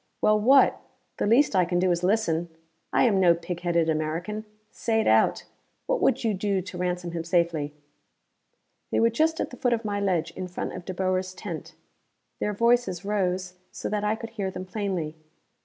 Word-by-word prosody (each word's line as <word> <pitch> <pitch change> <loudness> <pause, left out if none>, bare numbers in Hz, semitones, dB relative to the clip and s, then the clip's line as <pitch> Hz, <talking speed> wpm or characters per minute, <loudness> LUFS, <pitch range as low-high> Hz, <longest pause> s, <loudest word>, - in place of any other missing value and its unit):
Well 215 0 +4
what? 265 +5 +5 0.4
The - - 0
least 235 +1 +4
I 185 - +5
can 175 0 -1
do 180 0 +2
is 170 0 0
listen; 175 -4 +1 0.4
I - - +3
am 215 -6 +3
no 175 -2 +5
pig 170 +1 -5
headed 170 -2 +1
American. 165 +7 -2 0.3
Say 225 -1 0
it - - +1
out. 110 0 +3 0.4
What - - 0
would - - +2
you 225 -2 +1
do 195 0 0
to 185 0 -7
ransom 180 -1 -2
him 165 -1 -3
safely?" 170 -4 0 1.2
They - - +1
were 230 0 +4
just 320 +7 +1
at - - -2
the 250 - -9
foot 245 -1 +1
of 230 -1 -2
my 205 -1 -1
ledge, 185 -5 0
in 185 - -6
front 180 - -5
of 175 - -8
De 185 - -4
Boer's 185 0 -1
tent. 175 -4 -7 0.6
Their 210 - 0
voices 230 -4 +2
rose 185 -3 -1 0.2
so - - -5
that 210 0 -1
I 210 +1 +1
could 225 0 -8
hear 200 -4 -3
them 185 0 -6
plainly. 185 -6 -3
185 Hz, 195 wpm, -26 LUFS, 175-215 Hz, 1.2 s, what